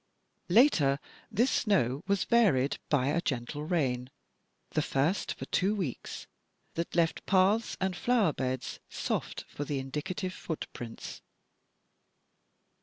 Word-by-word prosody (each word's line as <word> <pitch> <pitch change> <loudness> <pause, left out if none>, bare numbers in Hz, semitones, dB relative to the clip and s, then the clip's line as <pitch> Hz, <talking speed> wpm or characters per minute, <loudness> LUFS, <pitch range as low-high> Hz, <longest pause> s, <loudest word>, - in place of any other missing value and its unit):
Later 175 - +5 0.3
this 235 +4 +2
light - - +2
snow 150 - +2
was 200 -4 +2
varied 170 - +3
by 140 -2 +3
"a 170 +4 +1
gentle 135 +1 -2
rain, 130 -7 0 0.6
the - - +1
first 145 +9 0
for - - -6
two 195 +3 +1
weeks," 175 - -4 0.5
that 170 0 -3
left 165 -1 +2
paths 200 +4 +3
and 190 -1 0
flower 220 -7 +2
beds 130 -1 -3
soft - - -3
for 145 - -5
the 145 0 -2
indicative 150 +8 -3
footprints. 125 -9 -6
165 Hz, 120 wpm, -30 LUFS, 135-195 Hz, 0.6 s, Later